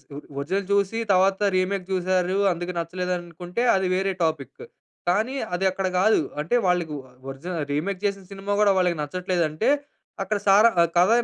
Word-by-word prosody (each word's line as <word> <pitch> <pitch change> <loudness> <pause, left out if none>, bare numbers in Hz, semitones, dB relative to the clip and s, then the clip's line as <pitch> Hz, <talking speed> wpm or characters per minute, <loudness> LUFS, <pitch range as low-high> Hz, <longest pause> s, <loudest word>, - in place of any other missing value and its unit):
ఓ - - -6 0.2
original 190 +7 -2
చూసి 200 +2 +1
తరువాత 190 +1 +3 0.2
remake 185 0 -1
చూసారు 185 0 +1 0.2
అందుకే 175 +1 -5
నచ్చలేదనుకుంటే 175 +2 -4
అది 190 -1 +1
వేరే 195 +1 0
టాపిక్కు. 160 - -3 0.4
కానీ 220 +9 +1 0.2
అదక్కడ 190 +1 0
కాదు. 215 +3 +4 0.2
అంటే 170 +11 0
వాళ్ళకి 175 -3 0
ఓ - - -8 0.3
ఒరిజిన 150 +7 -6 0.2
రీమేక్ 185 +6 -2
చేసిన 200 -1 -1
సినిమా 195 +1 -3
గూడా 205 -1 +5
వాళ్ళకి 180 -2 +1
నచ్చట్లేదంటే 175 - -1 0.5
అక్కడ 210 +3 -1
సారా 205 +4 +7
ఆహ్, 170 - +3
కథ 180 +3 +5
185 Hz, 150 wpm, -24 LUFS, 175-195 Hz, 0.5 s, సారా